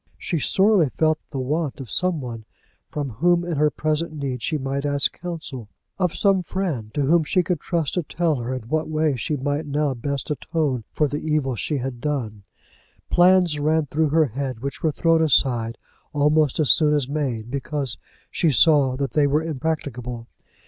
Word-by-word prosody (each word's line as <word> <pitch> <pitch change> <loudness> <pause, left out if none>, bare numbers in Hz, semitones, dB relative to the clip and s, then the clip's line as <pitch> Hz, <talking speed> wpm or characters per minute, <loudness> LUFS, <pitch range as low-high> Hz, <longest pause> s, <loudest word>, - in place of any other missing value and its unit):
She 170 - -2
sorely 190 -1 +3
felt 155 +3 +1
the 140 - -6
want 145 +3 -2
of 130 -4 -8
some 180 -4 +1
one 115 -3 -7 0.4
from 145 -3 -4
whom 170 +9 +2
in 170 -4 -2
her 150 +1 +4
present 155 +2 -1
need 135 -5 -4
she 155 - -1
might 135 0 -3
ask 145 -1 +2
counsel; 155 -10 -6 0.3
of 180 -3 0
some 195 -2 +3
friend 165 - -3
to 145 - +1
whom 160 +4 +3
she 180 +4 +1
could 175 -2 -1
trust 165 -4 -2
to 180 - +1
tell 165 -1 -1
her 120 +1 -4
in 130 -2 -4
what 155 +8 -2
way 155 -2 +1
she 145 +5 -2
might 145 +3 -2
now 145 -1 0
best 140 +3 -4
atone 145 -6 -1
for 150 - +1
the 145 +2 -3
evil 150 -5 0
she 115 +8 -2
had 125 -2 -5
done. 125 -9 -3 0.7
Plans 175 -3 +4
ran 155 +1 +2
through 155 +2 0
her 160 +1 +4
head 130 -1 -4
which 140 0 -5
were 160 - +1
thrown 165 +2 +2
aside 120 -6 +2 0.4
almost 150 0 +2
as 145 -8 +4
soon 150 -1 +5
as 140 -4 0
made, 130 -6 -3
because 140 - -3 0.3
she 165 - +1
saw 140 -1 +4
that 140 0 -2
they 150 -2 +3
were 150 +3 +1
impracticable. 130 -6 -4
145 Hz, 185 wpm, -23 LUFS, 130-160 Hz, 0.7 s, soon